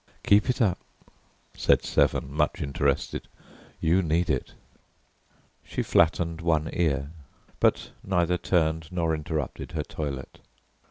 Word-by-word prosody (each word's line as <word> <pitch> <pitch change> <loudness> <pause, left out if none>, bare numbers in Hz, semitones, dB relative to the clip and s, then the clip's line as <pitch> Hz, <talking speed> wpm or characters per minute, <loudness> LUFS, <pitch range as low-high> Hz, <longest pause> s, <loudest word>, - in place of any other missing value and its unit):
"Keep 105 +5 +4
it 125 0 +2
up," 95 -4 +1 0.8
said - - +3
Severn, - - +1
much - - 0
interested, 70 -1 -1 0.5
"you 85 +4 +3
need 85 0 +1
it." 65 - -3 1.1
She - - -3
flattened 85 0 +2
one 80 -2 +1
ear, 70 -4 0 0.5
but - - +2
neither 90 -2 +1
turned 80 -2 0
nor 85 -3 0
interrupted 75 -2 -4
her 75 -2 -1
toilet. 70 -4 -6
80 Hz, 115 wpm, -26 LUFS, 75-90 Hz, 1.1 s, Keep